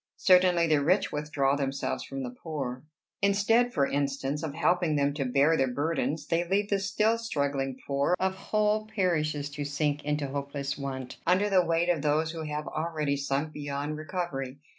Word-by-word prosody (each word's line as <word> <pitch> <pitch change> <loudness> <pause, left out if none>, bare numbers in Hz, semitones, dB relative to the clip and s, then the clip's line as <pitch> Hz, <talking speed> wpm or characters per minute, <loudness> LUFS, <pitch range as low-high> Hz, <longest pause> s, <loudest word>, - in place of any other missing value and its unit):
Certainly 180 -2 +5
the 155 -3 +2
rich 180 +7 +2
withdraw 150 -2 0
themselves 135 -1 -2
from 135 0 -5
the 125 - -4
poor. 135 -6 -4 0.4
Instead, 205 +5 +3
for 140 -11 +2
instance, 140 +1 -1
of 155 -3 -4
helping 165 0 +2
them 140 0 +2
to 140 -2 -2
bear 140 +5 +3
their 135 -4 +1
burdens, 145 +1 -1
they 165 +1 +1
leave 200 +4 0
the 200 - +3
still 210 +3 +1
struggling 140 - -2
poor 140 +5 +1
of 190 0 +1
whole 215 +2 0
parishes 155 -8 0
to 145 0 -4
sink 145 +1 -1
into 150 0 -1
hopeless 140 0 -3
want, 130 -2 -5
under 195 +4 +3
the 185 -2 +5
weight 170 +1 +1
of 170 -4 +2
those 155 +2 +1
who 165 -1 -6
have 150 -1 -4
already 155 -3 -1
sunk 140 +2 -2
beyond 145 +1 -3
recovery. 150 -5 -4
150 Hz, 175 wpm, -28 LUFS, 140-180 Hz, 0.4 s, Certainly